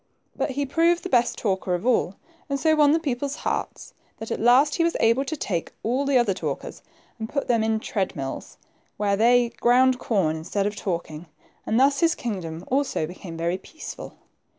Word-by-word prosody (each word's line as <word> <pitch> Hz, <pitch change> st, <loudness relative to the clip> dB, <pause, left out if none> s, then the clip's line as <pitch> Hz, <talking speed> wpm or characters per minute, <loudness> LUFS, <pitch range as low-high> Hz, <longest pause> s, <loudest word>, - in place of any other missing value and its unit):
But -, -, -1 dB
he 285 Hz, -, +1 dB
proved 335 Hz, +5 st, +2 dB
the 375 Hz, -, -4 dB
best 240 Hz, -6 st, +2 dB
talker 190 Hz, -3 st, -1 dB
of 175 Hz, -, -5 dB
all, 230 Hz, -6 st, +2 dB, 0.3 s
and 280 Hz, 0 st, -1 dB
so 315 Hz, +2 st, +3 dB
won 295 Hz, -1 st, +5 dB
the 310 Hz, -, +4 dB
people's 280 Hz, -2 st, -2 dB
hearts, -, -, -3 dB, 0.2 s
that 225 Hz, -, -7 dB
at -, -, -2 dB
last 260 Hz, +6 st, +5 dB
he 335 Hz, -, +2 dB
was 335 Hz, -, +1 dB
able 230 Hz, +4 st, +3 dB
to 315 Hz, +3 st, -4 dB
take 175 Hz, -, -3 dB
all 255 Hz, +5 st, 0 dB
the 275 Hz, -2 st, +3 dB
other 240 Hz, -5 st, +2 dB
talkers -, -, -5 dB, 0.4 s
and 220 Hz, 0 st, -4 dB
put 280 Hz, -, -2 dB
them 230 Hz, -3 st, +2 dB
in 220 Hz, 0 st, +1 dB
treadmills, 185 Hz, -11 st, -4 dB, 0.4 s
where 200 Hz, -1 st, +1 dB
they 240 Hz, +3 st, +4 dB
ground 250 Hz, +1 st, +4 dB
corn 180 Hz, -11 st, 0 dB
instead 185 Hz, +5 st, -2 dB
of 205 Hz, 0 st, -2 dB
talking; 170 Hz, -4 st, -4 dB, 0.2 s
* -, -, -34 dB
and 225 Hz, -, +2 dB
thus 275 Hz, +1 st, +4 dB
his 335 Hz, -1 st, +3 dB
kingdom 175 Hz, -8 st, -5 dB
also 265 Hz, -, 0 dB
became 170 Hz, 0 st, -9 dB
very 170 Hz, +3 st, -1 dB
peaceful. 315 Hz, +10 st, -9 dB
235 Hz, 195 wpm, -24 LUFS, 190-275 Hz, 0.4 s, won